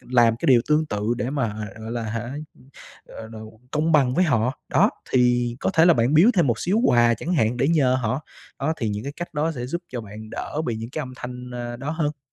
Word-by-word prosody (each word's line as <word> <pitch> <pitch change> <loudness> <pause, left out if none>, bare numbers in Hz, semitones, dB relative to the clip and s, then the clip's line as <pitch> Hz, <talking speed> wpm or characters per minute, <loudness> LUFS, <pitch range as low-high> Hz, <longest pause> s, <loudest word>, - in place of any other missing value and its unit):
làm 120 -3 +3
cái - - -4
điều 125 -3 +6
tương 155 +1 +3
tự 105 0 -1
để 125 - -2
mà 140 -4 0
h 105 0 -7
gọi 110 - -6
là, 120 - -2
hả, 115 +2 -4 0.8
ờ, 110 0 -10
đầu 110 0 -11
công 155 +2 0
bằng 135 -4 +4
với 185 - +3
họ. 125 -3 +1
Đó, - - +4 0.2
thì 120 -1 +2
có - - 0
thể 160 - +6
là 170 - +6
bạn 120 +4 +2
biếu 175 +10 +7
thêm 175 -5 +3
một 120 -4 +1
xíu 195 +5 +1
quà 120 -1 +4
chẳng 160 - -4
hạn 120 -4 +1
để 135 +3 +1
nhờ 140 -6 +3
họ. 125 +5 -1 0.4
Đó, 145 +4 +1
thì 115 - -2
những 105 0 -3
cái 140 - -4
cách 175 -2 -6
đó 155 +2 0
sẽ 125 -5 -5
giúp 170 +7 -4
cho 120 - -3
bạn 110 0 -10
đỡ 155 - -4
bị 115 - -1
những 115 +2 -6
cái 155 +3 -3
âm 130 -2 -8
thanh, 125 0 -7
a, 120 0 -5
đó 135 +4 -4
hơn. 150 -4 -4
125 Hz, 255 wpm, -23 LUFS, 115-150 Hz, 0.8 s, biếu